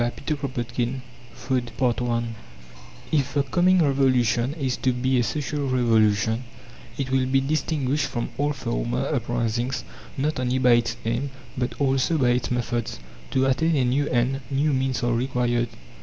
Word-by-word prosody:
Trans. 120 0 0
CHAPTER 150 +2 -2 0.3
V 120 +2 -2 0.3
FOOD 125 -3 -2 0.4
I 120 0 +1 0.9
If 140 -2 +1
the 140 - +3
coming 175 +6 +3
Revolution 130 -2 +2
is 135 -6 -1
to 130 - +1
be 130 +1 +1
a - - +3
Social 140 +4 -2
Revolution, 110 -2 +2 0.5
it 130 -2 -3
will 130 -1 +2
be 135 +1 +3
distinguished 145 0 0
from 120 -3 -3
all 145 +1 +2
former - - -2
uprisings 120 +2 -1 0.3
not 145 +1 0
only 125 0 0
by 125 -1 +4
its 115 -1 +2
aim, 120 +5 -1 0.3
but 125 -1 -3
also 135 +3 +2
by 130 -4 +3
its 120 0 +1
methods. 120 - -2 0.3
To 130 0 +2
attain 160 +5 +2
a 130 -3 +2
new 140 +4 +1
end, 125 +2 +1
new 145 +2 +1
means 130 -1 0
are 120 0 +2
required. 120 -1 0
130 Hz, 155 wpm, -24 LUFS, 120-140 Hz, 0.9 s, by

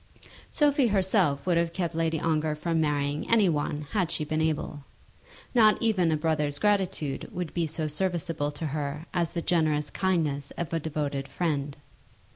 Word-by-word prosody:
Sophie 290 -4 +3
herself 190 -8 +2
would 175 -2 +2
have 170 0 +1
kept 175 -3 -2
Lady 165 -1 0
Ongar 155 -1 0
from 165 +1 0
marrying 145 -1 -1
any 220 -4 +5
one 150 -2 -1
had 185 -6 +1
she 155 - -2
been 155 +1 -1
able. 155 -2 -1 0.7
Not 220 -4 +5
even 195 -8 +2
a 155 - +2
brother's 150 -2 0
gratitude 190 -7 0
would 180 -3 -4
be 170 -2 0
so 160 +1 -3
serviceable 165 -2 -1
to 160 - -5
her 150 +1 -3
as 170 -2 +1
the 170 -1 -4
generous 155 -4 +1
kindness 155 -7 0
of 170 -1 -4
a 165 - +1
devoted 145 -3 -3
friend. 145 -2 -2
160 Hz, 165 wpm, -27 LUFS, 150-180 Hz, 0.7 s, any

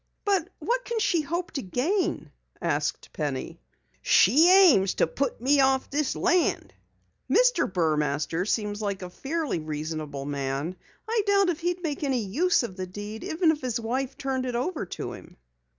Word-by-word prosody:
"But 385 -4 +1
what - - -1
can 470 - -3
she 395 -6 +2
hope 340 +4 -3
to 280 - -3
gain?" 290 - -1 0.3
asked - - -2
Penny. - - -4 0.4
"She 320 +7 +5
aims 340 - +6
to - - +3
put 275 -3 -2
me 275 +4 +3
off 265 -1 +2
this 290 -1 0
land." 350 -1 +1 0.6
"Mr. - - +3
Burmaster 155 0 0
seems 210 -1 -1
like 200 -2 -3
a 180 - -7
fairly 300 - -2
reasonable 155 -2 -5
man. 140 +4 -3 0.3
I 450 0 +1
doubt 395 -3 +3
he'd 350 +1 -2
make 300 -2 -3
any 260 -6 0
use 320 - +2
of 195 -5 -6
the 185 0 -4
deed 205 +4 -7
even 325 0 +2
if 300 - -4
his 250 -3 -2
wife 255 +4 -3
turned 265 -2 -2
it 245 - -3
over 255 - -2
to - - -5
him." - - -13
260 Hz, 165 wpm, -26 LUFS, -, 0.6 s, aims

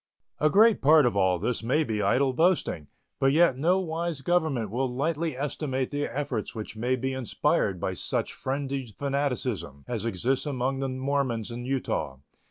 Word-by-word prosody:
A 155 - +4
great 215 +5 +5
part 150 +1 +6
of 120 - +1
all 95 -2 +3
this 120 +8 -2
may 130 +8 +2
be 110 -6 -2
idle 135 +3 +2
boasting, 160 - +1 0.3
but 135 - +4
yet 165 -2 +4
no 170 +8 +2
wise 165 -3 -3
government 150 - 0
will 130 +2 -1
lightly 155 +2 -1
estimate 135 -2 -2
the 145 0 -1
efforts 130 -4 -3
which 110 0 -6
may 120 +4 0
be 130 +1 -2
inspired 130 -4 0
by - - -2
such - - -2
frenzied 135 -4 -4
fanaticism 125 - -2
as 115 -4 -3
exists 120 - -1
among 135 -1 -1
the 135 -1 -1
Mormons 130 -4 -1
in 120 +1 -6
Utah. 110 - -2
135 Hz, 170 wpm, -27 LUFS, 120-145 Hz, 0.3 s, part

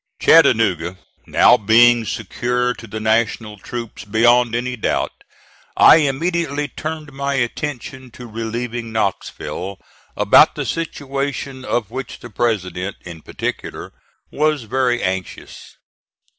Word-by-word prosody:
Chattanooga 105 - +4 0.3
now - - +5
being 115 +2 +5
secure 125 +4 -1
to 115 - -12
the 110 +1 -6
National 110 -1 0
troops 120 +1 -7
beyond 115 +2 +3
any 125 +1 -2
doubt, 110 - -1 0.7
I - - +8
immediately 150 0 -1
turned 155 -1 -6
my 140 0 -2
attention 130 0 -4
to 125 - -9
relieving 115 +1 -5
Knoxville, 100 -2 -3 0.4
about - - +5
the - - -3
situation 140 -4 -4
of 115 -4 -2
which 130 0 -6
the 120 - -12
President, 95 -4 -2
in 85 -3 -10
particular, - - -5 0.4
was 150 -2 0
very 120 +1 0
anxious. 95 -1 -5
120 Hz, 115 wpm, -19 LUFS, 110-135 Hz, 0.7 s, I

